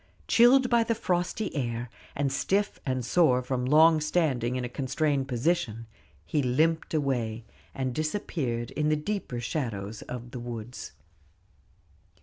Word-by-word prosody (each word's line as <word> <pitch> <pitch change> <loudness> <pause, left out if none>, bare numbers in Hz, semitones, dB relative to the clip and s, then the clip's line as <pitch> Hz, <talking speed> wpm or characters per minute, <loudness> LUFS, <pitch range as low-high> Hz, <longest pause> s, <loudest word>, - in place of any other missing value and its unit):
Chilled 250 +2 +6
by 235 -1 +4
the 230 0 0
frosty 180 0 -1
air, 120 -3 -2 0.3
and 140 -1 0
stiff 200 +8 0
and 130 -2 -1
sore 130 -2 +3
from 125 0 -2
long 155 +3 +6
standing 140 -7 +1
in 125 -1 -2
a - - -2
constrained 135 +2 -1
position, 120 -3 -1 0.4
he 150 - 0
limped 160 +6 +1
away, 120 -6 -1 0.3
and 130 -2 -2
disappeared 135 - -2
in 150 0 0
the 155 - +3
deeper 150 -6 -3
shadows 115 -5 -3
of 120 -1 -7
the 125 - -6
woods. 120 - -7
135 Hz, 135 wpm, -28 LUFS, 120-160 Hz, 0.4 s, Chilled